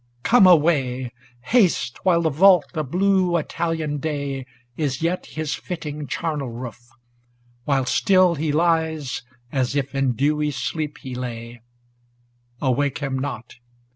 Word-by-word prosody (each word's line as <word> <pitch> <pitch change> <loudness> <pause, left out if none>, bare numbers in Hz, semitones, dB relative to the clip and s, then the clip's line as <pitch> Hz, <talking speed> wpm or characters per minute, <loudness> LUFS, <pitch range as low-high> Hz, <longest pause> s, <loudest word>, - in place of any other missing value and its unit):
ŌĆö 120 0 -39
Come 225 -5 +6
away 140 -7 +3 0.3
Haste, 185 - +2
while 170 -2 +3
the 160 - +1
vault 180 +2 +6
of 155 -5 -3
blue 185 0 +2
Italian 160 -2 -2
day 140 -3 -3 0.3
Is 145 0 -2
yet 175 +2 -1
his 155 -1 -3
fitting 150 -4 -5
charnel 145 0 -3
roof! 120 0 -8 0.8
while 135 -3 +1
still 185 +5 +4
He 155 -1 -1
lies, 160 -3 0 0.3
as 130 -1 -1
if 140 -1 -1
in 135 -2 +1
dewy 150 +4 +1
sleep 150 +3 -3
he 130 -2 -6
lay; 120 -1 -6 1.0
Awake 140 +1 0
him 135 -2 -3
not 130 -4 -6
145 Hz, 135 wpm, -22 LUFS, 130-165 Hz, 1.0 s, Come